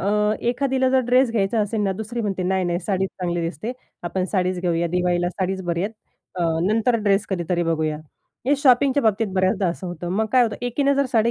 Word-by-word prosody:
अ, 190 - -2 0.4
एखादीला, 260 +1 +1
जर 265 0 +4
ड्रेस 250 0 +4
घ्यायचा 215 0 +1
असेल 210 +1 -1
ना 195 -1 +1
दुसरी 220 +4 -5
म्हणते 195 -3 -2
नाही, 190 0 0
नाही, 175 0 0
साडीच 190 +1 -1
चांगली 175 -1 -1
दिसते, 165 - -4 0.3
आपण 185 +2 -1
साडीच 185 -2 0
घेऊया 170 -1 0
दिवाळीला 175 0 +1
साडीच 190 0 -2
बरी 170 0 -1
आहेत. 210 +3 -2 0.4
अ, 180 - -2 0.2
नंतर 225 +3 +2
ड्रेस 200 0 +2
कधीतरी 175 -1 -1
बघूया. 160 -2 0 0.5
हे 285 - +4
शॉपिंगच्या 270 +1 +4
बाबतीत 220 -1 +2
बऱ्याचदा 190 +1 +2
असं 175 +2 -4
होतं 175 0 -5
मग 220 - +1
काय 255 -1 +6
होतं 220 -3 -1
एकीने 280 +3 +1
जर 275 -1 +1
साडी 230 -1 +3
195 Hz, 200 wpm, -22 LUFS, 175-235 Hz, 0.5 s, काय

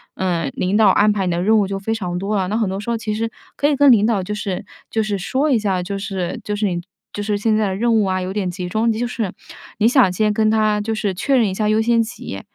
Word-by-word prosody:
呃， 170 -6 -1
领 190 +3 0
导 215 -2 +5
安 210 +2 +4
排 200 -2 -1
你 180 - 0
的 170 0 -1
任 220 +4 +4
务 200 - +1
就 195 0 -3
非 220 +3 -2
常 180 -4 -3
多 200 +3 -2
了。 190 -2 0
那 215 +3 -1
很 220 -4 0
多 190 +1 -3
时 210 - -6
候， 235 - 0
其 220 -1 -3
实 225 +1 -2 0.2
可 285 - +1
以 295 - +2
跟 280 0 +6
领 215 -3 +5
导 215 -4 +1
就 210 - -4
是 200 -3 -4 0.2
就 220 - 0
是 210 -2 -2
说 265 +10 0
一 240 - +3
下， 190 -4 -1
就 200 +2 -4
是 190 -3 -4
就 210 - -3
是 210 +1 -1
你 175 -3 -1 0.3
就 205 - -4
是 205 0 -1
现 215 +1 +1
在 215 -1 +1
的 190 - -2
任 235 +4 +1
务 220 -2 +3
啊， 185 -1 0
有 185 +1 -4
点 195 -3 -1
集 180 0 -5
中， 220 +5 +1
就 225 +2 -1
是 230 -5 -3 0.5
你 215 +1 +3
想 245 -7 +4
先 210 +3 +1
跟 215 0 +2
他 215 -1 +2
就 220 +1 -2
是 205 -2 -1
确 265 +9 0
认 225 -4 +3
一 190 - -2
下 210 +2 0
优 215 +1 +3
先 230 +1 +3
级。 220 - -6
210 Hz, 315 characters per minute, -20 LUFS, 190-220 Hz, 0.5 s, 跟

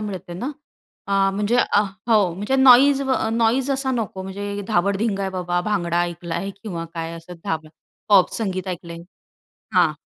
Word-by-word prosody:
मिळते 190 -4 -6
ना. 250 +10 -4 0.6
अ, 195 -1 +3
म्हणजे 210 +4 +1
अ, 205 - +3 0.3
हो. 210 -6 +4
म्हणजे 210 +8 -1
नॉईज 270 +2 +6
अ, 260 -4 +1
नॉईज 235 +4 +1
असा 270 0 0
नको, 210 -5 -3
म्हणजे 200 +1 -5
धाबड-धिंगा 200 +1 +1
आहे 190 - -2
बाबा, 175 -1 -1
भांगडा 175 -4 0
ऐकला 170 -1 -4
आहे 195 +3 -3
किंवा 170 -6 -5
काय 165 0 -4
असं 165 +2 -11
धाब 160 -5 -2 0.4
पॉप 200 -3 +5
संगीत 190 -4 -3
ऐकलंय. 170 -2 -6 0.7
हां, - - +4
195 Hz, 160 wpm, -22 LUFS, 175-225 Hz, 0.7 s, नॉईज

